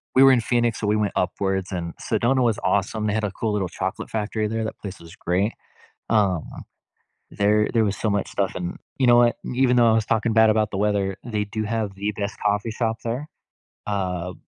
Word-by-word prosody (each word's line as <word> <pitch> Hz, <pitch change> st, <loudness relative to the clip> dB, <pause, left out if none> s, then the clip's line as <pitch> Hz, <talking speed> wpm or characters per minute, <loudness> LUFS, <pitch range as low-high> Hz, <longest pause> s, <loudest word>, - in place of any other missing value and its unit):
we 130 Hz, -, +7 dB
were 135 Hz, -, +8 dB
in 125 Hz, -2 st, +4 dB
Phoenix, 120 Hz, -1 st, +1 dB
so 105 Hz, -, -2 dB
we 105 Hz, -, +3 dB
went 105 Hz, -1 st, 0 dB
upwards, 95 Hz, +1 st, -1 dB
and 85 Hz, -2 st, -4 dB
Sedona 130 Hz, +2 st, +1 dB
was 115 Hz, -3 st, +1 dB
awesome, 100 Hz, +2 st, 0 dB
they 105 Hz, -, 0 dB
had 110 Hz, 0 st, -1 dB
a 105 Hz, -, -1 dB
cool 110 Hz, +2 st, -2 dB
little 95 Hz, -3 st, -1 dB
chocolate 95 Hz, +2 st, -4 dB
factory 110 Hz, 0 st, -2 dB
there, 110 Hz, +1 st, -2 dB
that 110 Hz, -, -5 dB
place 95 Hz, -2 st, -7 dB
was 85 Hz, 0 st, -13 dB
great. 95 Hz, +5 st, 0 dB, 0.6 s
Um, 100 Hz, -7 st, +2 dB, 0.9 s
there 105 Hz, +1 st, +2 dB
there 115 Hz, -2 st, +3 dB
was 100 Hz, -1 st, -1 dB
so 110 Hz, -, -1 dB
much 100 Hz, -1 st, -1 dB
stuff, 100 Hz, -2 st, -1 dB
and 90 Hz, -1 st, -4 dB, 0.2 s
you 130 Hz, -, +2 dB
know 120 Hz, -, +7 dB
what? 120 Hz, -1 st, +4 dB, 0.2 s
Even 125 Hz, 0 st, +3 dB
though 120 Hz, -1 st, +6 dB
I -, -, +4 dB
was 110 Hz, -1 st, +2 dB
talking 115 Hz, 0 st, +1 dB
bad 110 Hz, 0 st, +6 dB
about 110 Hz, -1 st, +2 dB
the 95 Hz, -, -4 dB
weather, 100 Hz, -1 st, 0 dB
they 105 Hz, -3 st, -2 dB
do 110 Hz, +2 st, -3 dB
have 110 Hz, -2 st, -2 dB
the 100 Hz, +2 st, -2 dB
best 100 Hz, 0 st, -4 dB
coffee 105 Hz, +2 st, +1 dB
shop 115 Hz, -1 st, -1 dB
there. 125 Hz, +6 st, -3 dB, 0.6 s
Uh, 90 Hz, -3 st, -2 dB
105 Hz, 220 wpm, -23 LUFS, 100-115 Hz, 0.9 s, were